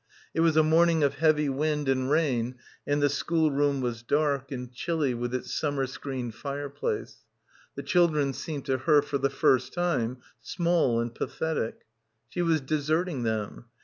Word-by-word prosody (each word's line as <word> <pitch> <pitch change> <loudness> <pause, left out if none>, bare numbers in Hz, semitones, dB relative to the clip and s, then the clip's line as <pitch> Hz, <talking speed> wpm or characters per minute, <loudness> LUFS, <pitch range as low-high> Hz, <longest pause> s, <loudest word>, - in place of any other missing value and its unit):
It - - -2
was 165 -1 +3
a 155 - +7
morning 165 0 +4
of 140 - +3
heavy 150 -1 +2
wind 150 +1 -1
and 130 -1 +1
rain 130 -6 +1 0.3
and 145 0 +1
the - - +6
schoolroom 145 -2 +1
was 120 -2 -3
dark, 140 +1 0
and 125 -2 -5
chilly 150 -1 -1
with 120 0 -3
its 130 - -4
summer 145 -3 0
screened 130 -2 -5
fireplace. 145 - -4 0.6
The - - -5
children 155 -6 +2
seemed 145 0 -5
to 130 -1 0
her 145 +1 +4
for 145 -1 -2
the 135 +1 +1
first 130 -1 +2
time 140 -9 0 0.2
small 170 - +1
and 120 0 -2
pathetic. 160 -2 -3 0.5
She 175 - -3
was 165 -3 +2
deserting 155 +2 -1
them. 110 -1 -3
145 Hz, 160 wpm, -27 LUFS, 130-155 Hz, 0.6 s, a